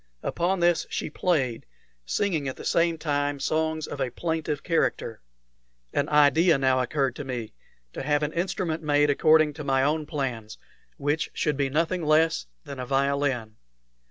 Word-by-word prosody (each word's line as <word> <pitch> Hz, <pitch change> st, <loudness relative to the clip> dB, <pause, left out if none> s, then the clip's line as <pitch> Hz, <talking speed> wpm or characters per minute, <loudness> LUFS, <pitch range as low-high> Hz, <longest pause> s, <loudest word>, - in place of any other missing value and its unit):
Upon 175 Hz, +2 st, 0 dB
this 175 Hz, -1 st, +2 dB
she -, -, -3 dB
played, 135 Hz, -10 st, -1 dB, 0.4 s
singing 160 Hz, -, 0 dB
at 130 Hz, -, -4 dB
the -, -, -10 dB
same 165 Hz, 0 st, +2 dB
time 145 Hz, -2 st, -1 dB
some 155 Hz, -, -1 dB
songs 160 Hz, 0 st, -1 dB
of 145 Hz, -, -6 dB
a 125 Hz, -, 0 dB
plaintive 160 Hz, +1 st, -3 dB
character. 160 Hz, -9 st, -1 dB, 0.7 s
An 145 Hz, -, 0 dB
idea 150 Hz, +3 st, +5 dB
now 130 Hz, -1 st, +2 dB
occurred 135 Hz, 0 st, -1 dB
to 145 Hz, -, -5 dB
me 125 Hz, -5 st, -5 dB, 0.4 s
to -, -, -5 dB
have 145 Hz, +2 st, +1 dB
an 150 Hz, -, -2 dB
instrument 175 Hz, -2 st, -2 dB
made 145 Hz, -1 st, +3 dB
according 155 Hz, +1 st, +4 dB
to 150 Hz, +1 st, -7 dB
my 135 Hz, -1 st, +2 dB
own 150 Hz, +1 st, 0 dB
plans, 125 Hz, -8 st, -4 dB, 0.4 s
which 145 Hz, +2 st, -1 dB
should 150 Hz, -, 0 dB
be 140 Hz, -1 st, 0 dB
nothing 165 Hz, +5 st, 0 dB
less 155 Hz, -, +2 dB, 0.2 s
than 140 Hz, -, -8 dB
a 125 Hz, -, -3 dB
violin. 135 Hz, -5 st, 0 dB
145 Hz, 165 wpm, -26 LUFS, 135-160 Hz, 0.7 s, idea